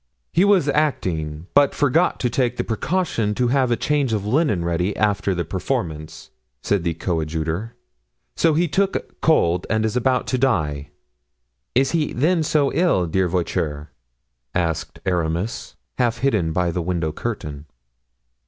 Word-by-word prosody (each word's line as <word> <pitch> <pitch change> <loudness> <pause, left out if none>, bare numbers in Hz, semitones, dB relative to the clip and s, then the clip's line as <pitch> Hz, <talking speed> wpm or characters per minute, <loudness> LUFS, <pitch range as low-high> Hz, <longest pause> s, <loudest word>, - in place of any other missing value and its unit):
"He 175 - +4
was 200 -7 +4
acting, 85 - -1
but 145 -1 +4
forgot 150 +5 +2
to 125 - +1
take 125 0 0
the - - 0
precaution 115 - -1
to 125 +1 +1
have 130 -1 +2
a 120 - +3
change 145 -5 0
of 105 -2 -1
linen 105 - +1
ready 90 +4 -1
after 100 -2 +1
the 85 -1 -2
performance," 80 +1 -4 0.3
said 100 -4 +1
the 85 -2 -1
coadjutor, 80 +5 -2 0.6
"so 160 -2 +3
he 170 +2 +2
took 195 +5 -1
cold 90 - +2
and 110 0 +1
is 110 - -1
about 125 +1 +1
to 130 - +2
die." 75 - 0 0.9
"Is 135 - +3
he 160 -3 0
then 160 +7 +2
so 150 -2 +1
ill, 170 - +2
dear 95 +3 +1
Voiture?" 80 -4 -2 0.6
asked 85 -3 -1
Aramis, 85 +3 -2 0.2
half 120 -2 +2
hidden 105 -12 +1
by 85 +1 0
the 85 - -2
window 85 -2 -1
curtain. 75 -8 -5
105 Hz, 150 wpm, -22 LUFS, 85-135 Hz, 0.9 s, He